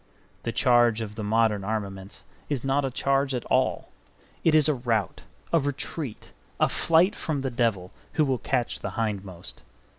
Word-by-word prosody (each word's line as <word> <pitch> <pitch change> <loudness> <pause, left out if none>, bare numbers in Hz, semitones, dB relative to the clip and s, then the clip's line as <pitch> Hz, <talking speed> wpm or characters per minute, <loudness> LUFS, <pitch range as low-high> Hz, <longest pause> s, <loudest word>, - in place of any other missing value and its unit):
The 115 - -2
charge 120 -2 +4
of 105 -2 -5
the 110 0 -5
modern 110 -1 +2
armaments 100 -2 -5 0.3
is 140 -5 -1
not 135 +1 +1
a 135 - 0
charge 135 +1 +1
at 125 - -4
all. - - +1 0.5
It 160 -2 +4
is 155 -1 +5
a 155 - +3
rout, 115 - -1 0.3
a 165 - +6
retreat, 140 -2 -4 0.3
a - - +4
flight 170 +5 +3
from 150 -4 -2
the 135 -1 -2
devil, 110 -7 0 0.2
who 155 - +3
will 130 -3 0
catch 125 -3 -1
the - - -4
hindmost. 100 -5 -4
120 Hz, 170 wpm, -26 LUFS, 110-140 Hz, 0.5 s, a